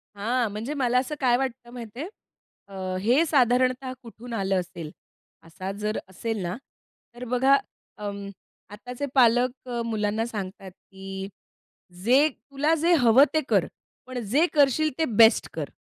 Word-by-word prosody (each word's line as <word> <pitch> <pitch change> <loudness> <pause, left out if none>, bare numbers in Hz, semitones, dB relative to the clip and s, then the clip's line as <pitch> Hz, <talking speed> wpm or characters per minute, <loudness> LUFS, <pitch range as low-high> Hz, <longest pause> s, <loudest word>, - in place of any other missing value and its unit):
हां, 230 +3 0
म्हणजे 220 +8 -4
मला 250 -2 +2
असं 270 +4 -3
काय 245 -2 +3
वाटतं 255 -2 -4
माहिती 235 0 -9
आहे? 330 - -4 0.6
अ, 190 -1 -4
हे 250 - +3
साधारणतः 255 -2 +2
कुठून 235 +1 -10
आलं 195 -3 0
असेल? 170 -3 -7 0.5
असा 175 +4 -7
जर 210 +1 -1
असेल 215 +3 -4
ना, 175 +1 -3 0.6
तर 240 - -8
बघा 265 +2 +5 0.4
अं, 200 -1 -6 0.4
आताचे 245 +6 -6
पालक 250 +1 +3 0.2
मुलांना 220 0 -1
सांगतात, 195 -4 -7
की 195 +1 -9 0.8
"जे 260 +7 +5
तुला 290 +2 -2
जे 335 +3 +2
हवं 240 +3 +7
ते 315 - +2
कर, - - +3 0.4
पण 255 -1 -5
जे 275 - +3
करशील 295 +1 +3
ते 320 - +3
बेस्ट 225 0 +6
कर" - - -4
235 Hz, 145 wpm, -25 LUFS, 205-260 Hz, 0.8 s, हवं